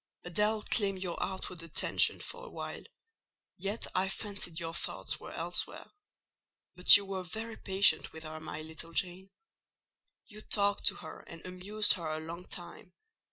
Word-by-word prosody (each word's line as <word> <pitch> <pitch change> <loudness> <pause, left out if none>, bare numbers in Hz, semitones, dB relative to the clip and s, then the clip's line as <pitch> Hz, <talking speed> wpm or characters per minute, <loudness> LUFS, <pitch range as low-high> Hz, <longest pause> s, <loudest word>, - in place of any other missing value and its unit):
Adèle 210 +4 +1
claimed 195 -4 +2
your 175 -2 -3
outward 190 -2 -3
attention 165 -2 +3
for 485 0 -8
a - - -8
while; - - -6 0.7
yet 205 +3 -2
I 190 +1 +1
fancied 195 -4 -4
your 165 -1 -4
thoughts - - -1
were - - -9
elsewhere: - - -1 0.8
but 180 +1 +10
you 200 - -5
were 195 -1 -3
very 220 +5 -5
patient 195 0 +3
with 160 0 -9
her, 155 0 -6
my 155 -1 -6
little 160 +1 -9
Jane; 185 +3 -2 1.0
you 215 -1 -10
talked 205 -1 +2
to - - +4
her - - -8
and 165 -1 -10
amused 195 +4 +2
her 170 -4 -4
a 155 0 -2
long 170 +3 -7
time. - - -6
185 Hz, 160 wpm, -32 LUFS, 165-205 Hz, 1.0 s, but